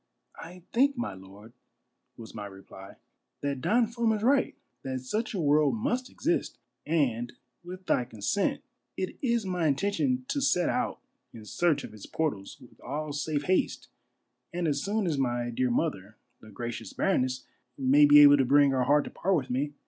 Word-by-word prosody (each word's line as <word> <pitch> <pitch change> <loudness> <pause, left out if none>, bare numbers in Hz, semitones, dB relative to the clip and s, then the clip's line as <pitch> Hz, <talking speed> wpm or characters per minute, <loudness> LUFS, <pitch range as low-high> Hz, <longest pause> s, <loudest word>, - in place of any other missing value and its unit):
" - - -52
" - - -34
I 180 +2 -11
think, 275 +3 +3
my 240 - -3
lord," 100 +4 -14 0.6
was 115 -1 -11
my 105 -2 -6
reply, 95 0 -13 0.5
"that 140 -2 -2
Don 235 - +3
Fum 235 0 0
is 210 -1 -3
right: 270 +3 +2 0.3
that 130 -1 -4
such 215 - -3
a - - -2
world 145 -4 +3
must 250 - -2
exist; 330 - -2 0.3
and 125 -7 0 0.3
with 185 +1 -9
thy 125 - +1
consent 115 - -1 0.3
it - - -4
is 235 -5 0
my 180 -3 0
intention 205 - 0
to 280 0 -1
set 180 -10 +2
out 250 -1 -2 0.3
in 110 -2 -11
search 155 - +1
of - - -9
its 105 -2 -11
portals 140 -12 -3
with 120 - -18
all 150 +3 -4
safe 145 0 -2
haste 185 +5 0 0.6
and 175 -1 -2
as 145 -2 0
soon 210 +1 -1
as 155 -5 -1
my 120 -2 -1
dear 125 +2 0
mother, 115 - -2 0.2
the 110 - -15
gracious 115 0 -6
baroness, 130 -9 0 0.3
may 140 +2 +5
be 145 0 +9
able 145 0 +8
to 135 - +3
bring 140 +2 +4
her 130 -2 +1
heart 145 +2 +4
to - - -9
part 195 +1 0
with 135 -6 -2
me." 145 +3 -2
145 Hz, 185 wpm, -28 LUFS, 120-190 Hz, 0.6 s, be